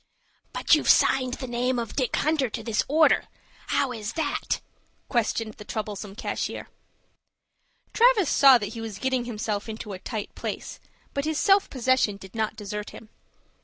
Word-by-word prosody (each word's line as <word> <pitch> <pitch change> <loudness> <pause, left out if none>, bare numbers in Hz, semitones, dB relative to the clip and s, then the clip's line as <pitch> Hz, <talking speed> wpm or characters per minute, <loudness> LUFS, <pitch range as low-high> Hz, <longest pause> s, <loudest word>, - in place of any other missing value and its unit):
"But - - +1
you've - - +4
signed 255 -1 +4
the 270 - -6
name 250 +1 -1
of 230 -2 -4
Dick 255 -5 0
Hunter 300 -4 +1
to 225 +1 -5
this 220 -1 +1
order. 315 +3 +4 0.4
How 270 - +1
is 220 -1 -5
that?" 310 -3 -1 0.5
questioned 225 -2 0
the 210 - -11
troublesome 210 -2 -5
cashier. - - -4 1.2
Travis 460 -6 +5
saw 270 -2 +7
that 210 -1 -5
he 230 - -6
was 220 -3 -6
getting 260 +1 -1
himself 215 -2 -3
into 215 -2 -6
a 185 - -7
tight 215 +1 -5
place; - - -6 0.3
but 280 +1 -2
his 315 -1 -1
self 395 +2 +4
possession 255 -5 +1
did 190 -1 -13
not 220 -1 -1
desert 210 -1 -5
him. 220 - -12
235 Hz, 165 wpm, -26 LUFS, 210-265 Hz, 1.2 s, saw